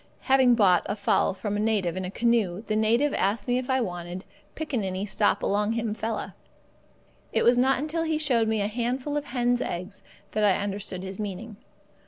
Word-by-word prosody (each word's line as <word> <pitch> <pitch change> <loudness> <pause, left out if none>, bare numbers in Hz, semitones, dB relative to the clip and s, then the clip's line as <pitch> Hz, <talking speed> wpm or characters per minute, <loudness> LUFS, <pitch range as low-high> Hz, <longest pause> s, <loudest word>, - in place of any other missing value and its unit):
Having 260 -2 +4
bought 190 -6 +4
a - - -2
fowl 200 -2 +1
from 200 +2 -3
a - - -1
native 210 -5 0
in 185 - -3
a - - -4
canoe, 220 -3 +1
the 215 - -1
native 235 +7 +2
asked 200 +2 0
me 245 0 +2
if 255 - -6
I 260 0 +2
wanted 175 -2 -5 0.3
"Pickaninny 205 -11 -2
stop 205 +1 +1
along 210 +2 +1
him 230 -2 -1
fella." 220 0 -4 1.0
It - - +1
was 240 - +5
not 260 +2 +3
until 305 +4 -2
he 320 -1 0
showed 250 -7 +2
me 220 -1 0
a 200 - 0
handful 250 +6 -2
of 295 0 -2
hen's 245 -1 0
eggs 180 +3 -5 0.3
that 215 - 0
I 200 -3 +4
understood 200 -2 -4
his 190 +1 -7
meaning. 210 +1 -6
220 Hz, 195 wpm, -26 LUFS, 200-245 Hz, 1.0 s, was